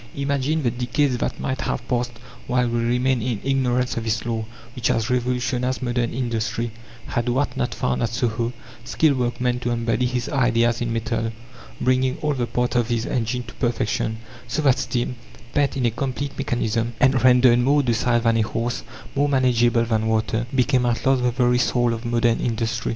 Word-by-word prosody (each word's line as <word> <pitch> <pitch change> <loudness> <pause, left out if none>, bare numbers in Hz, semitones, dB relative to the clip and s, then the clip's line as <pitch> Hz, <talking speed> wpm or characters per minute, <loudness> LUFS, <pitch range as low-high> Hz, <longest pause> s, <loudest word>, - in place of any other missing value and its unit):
Imagine 140 +2 0
the 120 - +2
decades 125 +2 0
that - - -2
might 130 - -2
have 120 - -3
passed 120 -1 -1 0.3
while 125 0 +2
we 120 0 0
remained 125 +1 +1
in 115 -2 -2
ignorance 125 -2 0
of 115 - -2
this 115 +1 -1
law, 115 -2 -2 0.3
which 125 - -1
has 115 +2 0
revolutionized 125 +1 0
modern 120 -1 0
industry, 115 -1 -2 0.3
had 120 +1 -1
Watt 135 +4 0
not - - -2
found 65 -1 -1
at 115 - +1
Soho 115 0 -1 0.3
skilled 135 +3 +2
workmen 125 0 0
to 120 - -2
embody 120 +1 0
his 125 0 -2
ideas 120 -4 +2
in 120 -1 -1
metal, 115 0 -1 0.5
bringing 130 0 +1
all 150 -1 +2
the 125 -3 -2
parts 125 +1 -1
of 120 -2 +2
his 120 -1 -1
engine 125 0 -1
to - - -11
perfection, 110 -2 -1 0.3
so 155 - -2
that 135 -3 +4
steam, 120 0 -2 0.4
pent 145 -1 +1
in 125 - 0
a 120 - +2
complete 135 +3 -3
mechanism, 120 -3 -1
and 130 -2 +3
rendered 125 -1 +6
more 140 +4 +3
docile 120 -1 +1
than 115 0 +2
a - - +3
horse, 115 +2 -2 0.3
more 145 +1 +2
manageable 120 -3 +3
than 110 -1 0
water, 110 +1 0
became 125 -1 +2
at 120 -1 -1
last 135 -1 +3
the 125 - +2
very 125 0 +2
soul 120 -1 +2
of 115 +1 -6
modern 120 -1 +2
industry. 115 -1 -1
120 Hz, 185 wpm, -23 LUFS, 115-130 Hz, 0.5 s, rendered